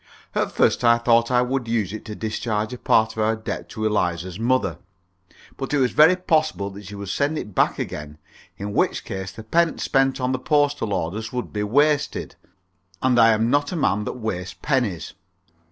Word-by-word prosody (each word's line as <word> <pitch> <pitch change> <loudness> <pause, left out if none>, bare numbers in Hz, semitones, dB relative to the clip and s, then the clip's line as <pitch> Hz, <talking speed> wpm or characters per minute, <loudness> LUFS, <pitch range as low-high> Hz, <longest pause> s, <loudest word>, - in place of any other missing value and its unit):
At - - 0
first - - +2
I 115 0 +6
thought 115 0 +3
I 125 -1 +3
would 125 -1 -2
use 110 -4 -1
it 110 - -7
to 105 -1 -6
discharge 110 +1 -2
a 125 - -7
part 110 0 +3
of 110 - -2
our 110 +1 +2
debt 110 - -6
to 110 -2 -4
Eliza's 90 -3 -1
mother. 130 +3 0 0.8
But 135 +2 -2
it - - +3
was 130 -3 +2
very 160 +4 +6
possible 155 - 0
that 100 0 -11
she 105 - -8
would 100 -1 -7
send 145 +8 0
it 105 - -6
back - - +2
again, 75 0 -6 0.4
in 100 +1 -5
which - - 0
case 95 -1 -5
the 110 +2 -10
pence 165 +8 +1
spent 135 -1 +2
on 125 0 0
the 130 - -1
postal 145 -5 +1
orders 100 +5 -3
would 125 -1 -4
be 105 - -2
wasted, 145 +8 +1 0.7
and 125 -2 +3
I 115 0 +7
am 115 +1 +2
not 145 +1 +2
a - - -3
man 105 - +1
that - - -4
wastes 95 -6 -4
pennies. 120 - -1
115 Hz, 200 wpm, -23 LUFS, 105-135 Hz, 0.8 s, I